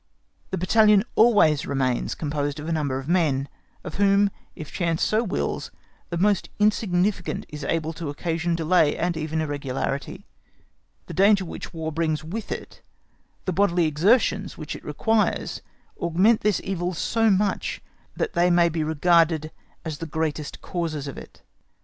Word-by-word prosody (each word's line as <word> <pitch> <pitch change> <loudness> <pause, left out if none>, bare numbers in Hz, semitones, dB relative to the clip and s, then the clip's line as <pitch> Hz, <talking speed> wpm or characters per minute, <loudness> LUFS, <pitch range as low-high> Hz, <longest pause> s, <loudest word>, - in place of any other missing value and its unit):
The 190 - -2
battalion 210 +2 +4
always 205 -11 +4
remains 130 -3 0
composed 145 -1 -2
of 150 - -7
a - - -2
number 145 -5 -1
of 135 +1 -6
men, 155 -6 +1 0.4
of - - -7
whom, 200 0 +4 0.2
if 155 - -8
chance 170 -3 0
so 215 +2 +2
wills, 200 - -2 0.4
the 170 - -3
most 200 +1 +2
insignificant 190 -5 +1
is 150 -1 -7
able 160 +1 -1
to 165 -2 -5
occasion 165 +3 -1
delay 165 -2 +2
and 175 0 0
even 160 0 -2
irregularity. 140 -2 -3 0.8
The - - -8
danger 195 0 +4
which - - -7
War 160 -1 -4
brings 155 -1 -1
with 205 +8 -6
it, - - -7 0.6
the 185 - -1
bodily 180 -2 +2
exertions 195 - +2
which 155 -2 -6
it - - -10
requires, 215 +9 0 0.4
augment 185 +7 +3
this 210 -2 +2
evil 180 -2 -2
so 225 +7 +1
much 200 +1 0 0.4
that 465 - -2
they 175 +1 +3
may 175 -1 +4
be 160 -1 -2
regarded 160 0 +2 0.3
as 155 -3 -4
the 165 - -5
greatest 155 -1 -3
causes 160 -5 -3
of 140 - -6
it. - - -12
165 Hz, 155 wpm, -24 LUFS, 155-195 Hz, 0.8 s, battalion